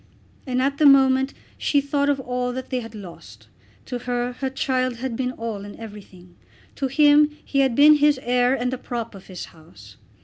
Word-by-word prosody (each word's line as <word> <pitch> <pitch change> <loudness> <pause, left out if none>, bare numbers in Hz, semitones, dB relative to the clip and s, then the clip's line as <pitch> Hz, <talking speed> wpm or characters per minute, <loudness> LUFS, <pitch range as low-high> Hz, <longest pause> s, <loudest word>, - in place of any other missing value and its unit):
And 255 0 0
at 280 +1 -1
the 300 - +6
moment 265 -1 +5 0.3
she 285 - +2
thought 285 0 0
of 280 -1 +1
all 250 -1 -3
that 260 +1 -7
they 255 - 0
had 225 -2 -9
lost. 190 -5 -12 0.4
To 250 -2 -5
her 245 0 -3
her 265 +1 -3
child 255 -1 -1
had 240 0 -4
been 250 +1 -2
all 225 -4 -5
and 205 0 -10
everything. 195 -5 -12 0.4
To 270 - -1
him 295 +2 +5 0.2
he 275 - -1
had 265 -3 +2
been 300 +2 +7
his 295 -2 +3
heir 245 +1 +2
and 250 0 -2
the 255 - -4
prop 235 -3 -5
of 195 -1 -13
his 185 -2 -7
house. 105 - -17
250 Hz, 200 wpm, -23 LUFS, 230-275 Hz, 0.4 s, been